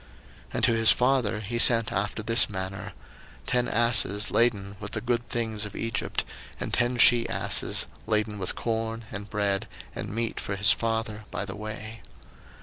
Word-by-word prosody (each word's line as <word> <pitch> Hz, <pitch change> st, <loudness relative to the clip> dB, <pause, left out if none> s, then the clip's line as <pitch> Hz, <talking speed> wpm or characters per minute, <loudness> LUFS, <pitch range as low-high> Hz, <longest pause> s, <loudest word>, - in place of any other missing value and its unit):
01:045:023 -, -, -12 dB
And -, -, -2 dB
to 115 Hz, -, +4 dB
his 115 Hz, 0 st, +6 dB
father 125 Hz, -5 st, +1 dB
he 115 Hz, +3 st, -4 dB
sent 115 Hz, -2 st, +6 dB
after 100 Hz, +3 st, -2 dB
this 115 Hz, 0 st, +5 dB
manner; 95 Hz, -1 st, -6 dB, 0.5 s
ten 125 Hz, -1 st, +1 dB
asses 110 Hz, -3 st, +2 dB
laden 100 Hz, -4 st, +1 dB
with 105 Hz, 0 st, -7 dB
the -, -, -1 dB
good 120 Hz, 0 st, -2 dB
things 110 Hz, -3 st, -2 dB
of 105 Hz, -1 st, -7 dB
Egypt, 115 Hz, -2 st, -2 dB, 0.4 s
and -, -, -5 dB
ten 120 Hz, +1 st, +1 dB
she 120 Hz, 0 st, +5 dB
asses -, -, -1 dB, 0.2 s
laden 105 Hz, -1 st, 0 dB
with 95 Hz, -, -2 dB
corn 115 Hz, 0 st, -3 dB
and 105 Hz, 0 st, -7 dB
bread 100 Hz, -2 st, 0 dB, 0.3 s
and -, -, -6 dB
meat 115 Hz, +2 st, -2 dB
for 100 Hz, -, -4 dB
his 100 Hz, +2 st, +4 dB
father 110 Hz, -1 st, -2 dB
by -, -, -4 dB
the 95 Hz, -, -7 dB
way. 110 Hz, +1 st, -8 dB
110 Hz, 170 wpm, -26 LUFS, 105-115 Hz, 0.5 s, his